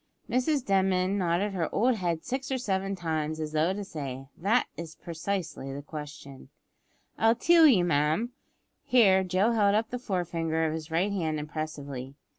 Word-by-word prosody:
Mrs 255 +3 +1
Denman 190 0 +2
nodded 185 +3 0
her 170 -4 -1
old 240 +2 +2
head 170 -4 -2
six 265 +1 -3
or 265 - +1
seven 195 -5 -1
times, 160 -3 -2
as 155 -1 -3
though 155 +3 +2
to 205 +2 -4
say, 135 -8 -6
"That 210 +8 +2
is 165 -2 -7
precisely 170 -4 -4
the 140 +1 -6
question." 150 -3 -9 0.7
"I'll 225 +1 +4
tell 330 +5 +6
you, 210 -11 +5
ma'am," 160 - +1 0.5
here 195 -7 +5
Joe 185 +5 +2
held 205 -3 +3
up 220 +1 0
the 250 - -3
fore 185 -7 -2
finger 160 -1 -1
of 155 - -1
his 160 0 -6
right 175 +5 +1
hand 160 -6 -1
impressively. 145 -3 -6
180 Hz, 170 wpm, -28 LUFS, 155-205 Hz, 0.7 s, tell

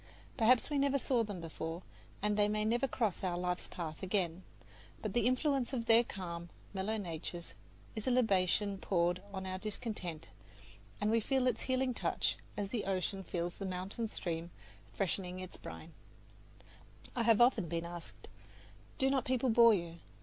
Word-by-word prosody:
Perhaps 240 +3 +4
we 290 - +2
never 275 0 +3
saw 250 -3 +2
them 205 -4 -5
before, 165 +1 -5 0.4
and 210 0 +2
they 205 0 +3
may 210 0 +1
never 240 +5 +2
cross 220 -8 -1
our 180 -2 0
life's 180 0 -1
path 160 -3 -5
again; 185 -3 0 0.6
but 215 -3 -3
the 240 -1 +3
influence 270 0 +1
of 235 -3 -1
their 230 +1 +7
calm, 170 -5 -6 0.2
mellow 200 +3 -1
natures 170 -2 -5 0.4
is 215 +1 -4
a - - +5
libation 200 -4 +2
poured 175 -1 +2
upon 195 -1 -7
our 185 0 -3
discontent, 200 -7 -5 0.7
and 210 +1 +2
we 230 - +4
feel 260 +3 +1
its 250 -3 +1
healing 260 0 +1
touch, - - 0 0.2
as 200 -1 -1
the 215 -2 -2
ocean 195 0 -1
feels 175 -1 -3
the 195 - -3
mountain 190 +5 -2
stream 170 -5 -3 0.4
freshening 185 -1 -2
its 185 -1 -7
brine. - - -9 1.2
I 245 - +1
have 230 -2 +5
often 240 -6 +5
been 165 +1 -2
asked, 170 -1 -8 0.7
"Do 265 - +3
not 270 -2 +2
people 255 -1 +2
bore 230 -1 +8
you?" 170 -2 -4
200 Hz, 165 wpm, -35 LUFS, 180-235 Hz, 1.2 s, bore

